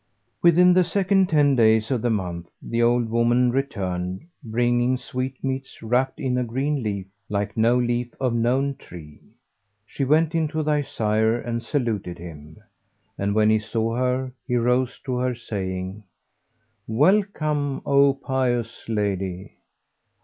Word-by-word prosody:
Within 175 +1 +6
the 185 0 +5
second 190 +1 +2
ten 145 -3 +4
days 110 -1 +3
of 125 -4 0
the 120 - 0
month 90 -5 -3
the 115 0 -2
old 120 0 +3
woman 120 +2 +2
returned, 95 -8 -2 0.2
bringing 120 +2 +1
sweetmeats 130 +1 -4
wrapped 125 +4 0
in 125 -2 0
a - - 0
green 135 +5 -1
leaf, 100 -4 -3 0.2
like 105 0 -2
no 115 +2 +3
leaf 120 0 -1
of 130 -3 0
known 130 +4 +1
tree. 80 - -12 0.6
She 135 - -4
went 155 +4 +3
in 165 -1 +1
to 155 +1 -2
thy 150 -1 +1
sire 110 -3 0
and 115 -1 -3
saluted 115 - -2
him; 80 -3 -11 0.6
and, 100 +1 -1
when 110 0 +4
he 110 - +3
saw 115 +1 -2
her, 130 +1 0 0.2
he 125 - 0
rose 125 +1 +1
to 130 -2 -2
her 125 0 0
saying, 95 -3 -5 0.8
'Welcome, 150 - +1
O 140 -1 +4
pious 125 -5 -2
lady!' 95 -3 -2
120 Hz, 140 wpm, -23 LUFS, 110-135 Hz, 0.8 s, Within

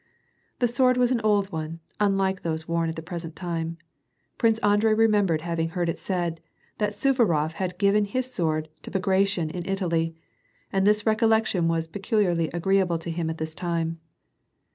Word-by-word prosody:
The 245 - +2
sword 250 +1 +3
was 250 0 +3
'an 240 -3 +1
old 205 -2 +2
one, 160 0 -5 0.2
unlike 195 -2 +1
those 160 -1 -3
worn 165 0 0
at 160 - -4
the 160 - -6
present 170 -2 -6
time. 165 -2 -3 0.6
Prince 225 -2 +3
Andrei 210 +1 +4
remembered 205 -7 +3
having 165 -1 -2
heard 175 0 -1
it - - -3
said, 175 -4 -2 0.4
that 210 -1 0
Suvarof 205 - +2
had 180 +2 -4
given 205 +1 +3
his 255 +5 -2
sword 155 -4 0
to - - -8
Bagration 190 -3 +1
in 175 +1 -4
Italy, 165 -4 0 0.6
and 195 0 +2
this 210 0 +3
recollection 220 -5 +2
was 165 -1 0
peculiarly 185 -2 0
s^ree 190 +4 +1
able 175 -3 +1
to 165 +1 -5
him 165 -1 -2
at 160 - -4
this 160 0 -4
time. 165 -1 -2
180 Hz, 170 wpm, -25 LUFS, 165-210 Hz, 0.6 s, Andrei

